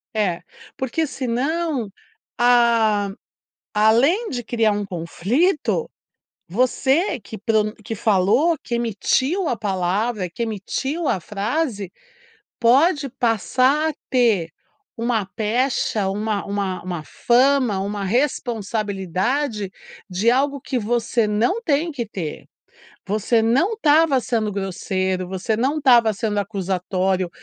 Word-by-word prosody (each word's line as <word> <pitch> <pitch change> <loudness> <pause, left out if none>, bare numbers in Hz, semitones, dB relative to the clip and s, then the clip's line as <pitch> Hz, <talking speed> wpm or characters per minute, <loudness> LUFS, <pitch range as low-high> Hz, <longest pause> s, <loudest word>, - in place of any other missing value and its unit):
É, 180 -5 0 0.4
porque 295 +5 -1
senão, 270 -1 -2 0.5
a 230 -4 +3 0.6
além 245 - +3
de 245 -3 -4
criar 225 -2 +1
um 205 0 -2
conflito, 240 - 0 0.6
você 265 - +1
que 220 - -9
pronun 215 0 +1
que 225 +1 -4
falou 215 - +2
que 240 - -3
emitiu 260 - 0
a 245 - 0
palavra, 195 +1 -1
que 235 +8 -4
emitiu 265 - -3
a 185 - +1
frase, 210 - -2 0.7
pode 275 +5 +3
passar 255 +6 +1
a 305 - -7 0.2
ter 225 -10 +2 0.5
uma 230 -3 0
pecha, 220 -1 0
uma 210 +1 -2
uma 200 -2 -2
uma 175 -3 -4
fama, 250 - +2
uma 200 +1 -3
responsabilidade 215 - -1 0.4
de 195 +6 +2
algo 280 +2 +1
que 260 -1 -2
você 235 0 0
não 230 - +1
tem 320 0 0
que 240 -5 -4
ter. 175 -7 -6 0.6
Você 215 +3 +2
não 270 - +2
estava 310 - +4
sendo 225 -4 -1
grosseiro, 190 -1 -2
você 190 +4 -2
não 270 +6 0
estava 240 -6 +5
sendo 210 0 -2
acusatório, 190 -2 -1
225 Hz, 115 wpm, -21 LUFS, 200-265 Hz, 0.7 s, estava